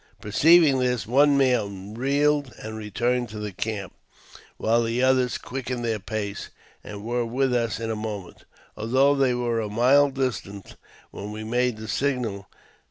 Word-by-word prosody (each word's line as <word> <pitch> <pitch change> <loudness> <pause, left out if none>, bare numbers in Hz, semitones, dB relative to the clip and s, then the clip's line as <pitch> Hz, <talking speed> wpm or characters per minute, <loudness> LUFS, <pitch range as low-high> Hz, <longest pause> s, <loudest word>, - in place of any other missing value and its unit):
Perceiving 150 +5 +5
this, 125 -2 0
one 140 +4 +4
man 105 -7 0
wheeled 140 +2 +1
and 110 0 -7
returned 120 +3 -1
to 105 - -8
the 105 -1 -4
camp, 100 0 -4 0.6
while 115 +1 +2
the 115 +2 0
others 130 -1 +2
quickened 125 -2 -5
their 110 -2 -1
pace, 100 -1 -5 0.3
and 100 -1 -8
were 120 +2 -1
with 125 +3 0
us 115 -2 0
in 115 -1 -3
a - - -2
moment, 105 -4 -7 0.3
although 130 +6 +3
they 135 -3 +2
were 120 -1 -1
a 110 -2 -3
mile 130 +6 +4
distant 125 -7 -4 0.4
when 105 +1 -7
we 110 +1 -6
made 120 +1 0
the 110 0 -8
signal. 120 -8 -2
120 Hz, 160 wpm, -25 LUFS, 110-130 Hz, 0.6 s, Perceiving